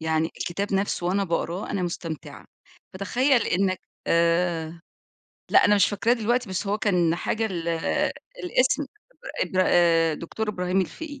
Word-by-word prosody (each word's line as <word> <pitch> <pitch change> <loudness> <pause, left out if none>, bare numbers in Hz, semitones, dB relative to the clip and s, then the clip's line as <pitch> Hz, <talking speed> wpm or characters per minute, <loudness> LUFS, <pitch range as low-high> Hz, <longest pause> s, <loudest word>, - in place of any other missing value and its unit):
يعني 160 0 +1
الكتاب 200 +3 -2
نفسه 195 -2 -1
وأنا 195 +2 +1
باقراه 170 +2 -2
أنا 190 - -1
مُستمتعة، 165 -3 -5 0.5
فتخيّل 245 +7 +2
إنَّك 185 0 0 0.3
آآ 170 -1 +1 0.7
لأ، - - +6
أنا 205 - +5
مش 200 -2 +4
فاكراه 215 +3 +1
دلوقتي، 240 0 0
بس 185 +2 -3
هو 205 +2 0
كان 175 -5 +2
حاجة 220 +5 -1
ال 170 -4 -4 0.8
الاسم 290 -2 +2 0.6
إبرا 185 -1 +1
آآ 165 -2 +4
دكتور 215 +8 -5
إبراهيم 180 -2 0
الفقِي 285 - -6
185 Hz, 140 wpm, -25 LUFS, 170-210 Hz, 0.8 s, لأ